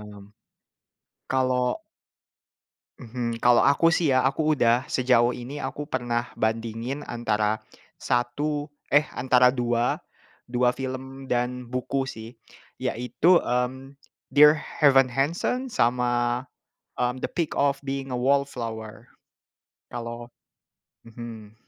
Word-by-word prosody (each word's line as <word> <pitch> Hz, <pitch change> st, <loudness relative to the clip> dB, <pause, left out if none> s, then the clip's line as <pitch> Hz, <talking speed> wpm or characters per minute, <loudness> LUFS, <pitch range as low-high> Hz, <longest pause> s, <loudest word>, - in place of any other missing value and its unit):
paham. -, -, -11 dB, 1.2 s
Kalau 130 Hz, -1 st, 0 dB, 1.2 s
Mhm, 115 Hz, -1 st, -4 dB
kalau 120 Hz, -1 st, +6 dB
aku 155 Hz, +4 st, +4 dB
sih 160 Hz, -5 st, +2 dB
ya 130 Hz, -, +3 dB
aku 155 Hz, +3 st, +1 dB
udah 120 Hz, -2 st, +2 dB
sejauh 125 Hz, -1 st, +2 dB
ini 125 Hz, +4 st, -7 dB
aku 140 Hz, +1 st, -4 dB
pernah 120 Hz, -4 st, -2 dB
bandingin 115 Hz, +5 st, -2 dB
antara 110 Hz, -2 st, -1 dB, 0.4 s
satu 145 Hz, +5 st, -1 dB, 0.2 s
eh 145 Hz, +2 st, +4 dB
antara 125 Hz, 0 st, +4 dB
dua, 120 Hz, -1 st, 0 dB, 0.5 s
2 125 Hz, 0 st, +2 dB
film 130 Hz, +1 st, -6 dB
dan 125 Hz, 0 st, -1 dB
buku 130 Hz, +2 st, -2 dB
sih 110 Hz, -3 st, -8 dB, 0.5 s
yaitu, 135 Hz, +9 st, +2 dB
mmm, 130 Hz, +3 st, -2 dB, 0.3 s
Dear 150 Hz, +2 st, +6 dB, 0.2 s
Evan 135 Hz, -4 st, +5 dB
Hansen 170 Hz, -, -1 dB
sama, 120 Hz, -, +1 dB, 0.6 s
mmm, 125 Hz, +1 st, 0 dB
The -, -, -3 dB
Perks 170 Hz, -3 st, -2 dB
of 140 Hz, -1 st, +1 dB
Being 135 Hz, -1 st, -4 dB
a -, -, -1 dB
Wallflower, 120 Hz, -4 st, -2 dB, 0.8 s
kalau 120 Hz, 0 st, -6 dB, 0.7 s
mhm. 115 Hz, -2 st, -10 dB
125 Hz, 110 wpm, -25 LUFS, 120-135 Hz, 1.2 s, kalau